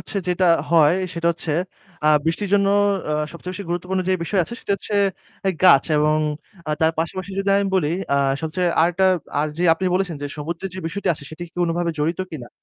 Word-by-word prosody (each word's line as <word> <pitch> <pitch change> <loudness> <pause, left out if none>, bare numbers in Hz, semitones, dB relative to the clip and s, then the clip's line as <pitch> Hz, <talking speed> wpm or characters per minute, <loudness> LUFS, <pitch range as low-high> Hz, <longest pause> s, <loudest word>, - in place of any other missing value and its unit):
হচ্ছে - - -7
যেটা 180 +1 +2 0.2
হয়, 165 -1 +5 0.2
সেটা 170 0 -2
হচ্ছে 160 -2 -4 0.5
আ - - +3 0.2
বৃষ্টির 180 +5 -1
জন্য 200 -1 +3 0.4
অ্যাঁ 150 0 0
সবচেয়ে 180 +2 -7
বেশি 200 - -5
গুরুত্বপূর্ণ 180 +2 -1
যেই 185 - +2
বিষয় 185 +4 +1
আছে 235 - -8
সেটা 200 - -2
হচ্ছে 210 - -6 0.7
গাছ 140 -7 +7
এবং 150 +1 +3 0.5
আ - - 0
তার 160 0 +3
পাশাপাশি 185 +4 -3
যদি 195 0 0
আমি 200 - 0
বলি 160 -6 +2 0.3
আ - - +3 0.3
সবচেয়ে 175 +3 0
আরেকটা 175 +3 +3 0.3
আর 150 - +1
যে 180 - +1
আপনি 185 - -4
বলেছেন 180 -4 -1
যে - - -2
সমুদ্রের 170 +5 -5
যে - - -6
বিষয়টি 190 +5 -3
আছে 140 - -12
সেটি 160 +2 -8
কি 170 - -22
কোনভাবে 170 0 0
জড়িত 165 +5 0
কিনা। 125 -7 -8
170 Hz, 200 wpm, -22 LUFS, 160-185 Hz, 0.7 s, গাছ